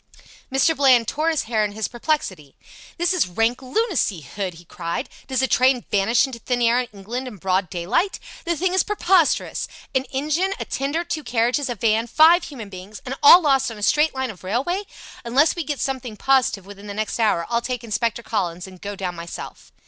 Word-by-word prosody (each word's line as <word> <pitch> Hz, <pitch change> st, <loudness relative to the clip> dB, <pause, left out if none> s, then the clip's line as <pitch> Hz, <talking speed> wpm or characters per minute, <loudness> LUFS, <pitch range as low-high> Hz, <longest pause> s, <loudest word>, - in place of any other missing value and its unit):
Mr. 270 Hz, +5 st, +3 dB
Bland 255 Hz, -5 st, +4 dB
tore 310 Hz, +3 st, 0 dB
his 320 Hz, -3 st, 0 dB
hair 220 Hz, -1 st, 0 dB
in 205 Hz, -1 st, -2 dB
his 220 Hz, 0 st, -2 dB
perplexity. 230 Hz, -, -3 dB, 0.4 s
"This 345 Hz, +2 st, +1 dB
is 355 Hz, -, +2 dB
rank 225 Hz, +7 st, 0 dB
lunacy, 265 Hz, -, 0 dB
Hood!" 180 Hz, +6 st, -5 dB
he 175 Hz, +1 st, -15 dB
cried. 170 Hz, -, -4 dB, 0.2 s
"Does 260 Hz, -1 st, 0 dB
a -, -, +3 dB
train 255 Hz, 0 st, +3 dB
vanish 215 Hz, +6 st, +3 dB
into 260 Hz, -3 st, -8 dB
thin 245 Hz, +1 st, -1 dB
air 235 Hz, +1 st, +4 dB
in 250 Hz, -, -2 dB
England 225 Hz, +6 st, -6 dB
in 230 Hz, -5 st, -8 dB
broad 185 Hz, 0 st, 0 dB
daylight? 195 Hz, -, -1 dB, 0.2 s
The 340 Hz, -1 st, -1 dB
thing 365 Hz, +2 st, 0 dB
is 375 Hz, -, +4 dB
preposterous. 375 Hz, -5 st, +1 dB, 0.3 s
An 260 Hz, 0 st, +1 dB
engine, 305 Hz, +9 st, -1 dB
a -, -, -3 dB
tender, 285 Hz, +5 st, -2 dB
two 320 Hz, -3 st, -4 dB
carriages, 245 Hz, +3 st, 0 dB
a 245 Hz, -, -2 dB
van, 225 Hz, +2 st, +1 dB
five 325 Hz, +7 st, +5 dB
human 235 Hz, -8 st, -8 dB
beings 190 Hz, +2 st, -10 dB
and 255 Hz, -, -3 dB
all 345 Hz, +5 st, +9 dB
lost 270 Hz, -3 st, +3 dB
on 225 Hz, -, -8 dB
a 210 Hz, -, -8 dB
straight 300 Hz, +5 st, +3 dB
line 265 Hz, -2 st, -2 dB
of 190 Hz, -, -16 dB
railway! 275 Hz, -, -1 dB, 0.4 s
Unless 260 Hz, +7 st, +3 dB
we 340 Hz, -, -2 dB
get 290 Hz, -2 st, -4 dB
something 255 Hz, -5 st, -3 dB
positive 255 Hz, -8 st, +2 dB
within 200 Hz, +1 st, -11 dB
the 200 Hz, -, -6 dB
next 215 Hz, +2 st, -3 dB
hour 210 Hz, -7 st, +2 dB
I'll 235 Hz, 0 st, 0 dB
take 250 Hz, 0 st, -4 dB
Inspector 230 Hz, +1 st, -1 dB
Collins, 180 Hz, -6 st, -2 dB
and 185 Hz, -2 st, -13 dB
go 205 Hz, 0 st, -5 dB
down 185 Hz, -2 st, -4 dB
myself." 170 Hz, 0 st, -9 dB
245 Hz, 205 wpm, -22 LUFS, 205-285 Hz, 0.4 s, all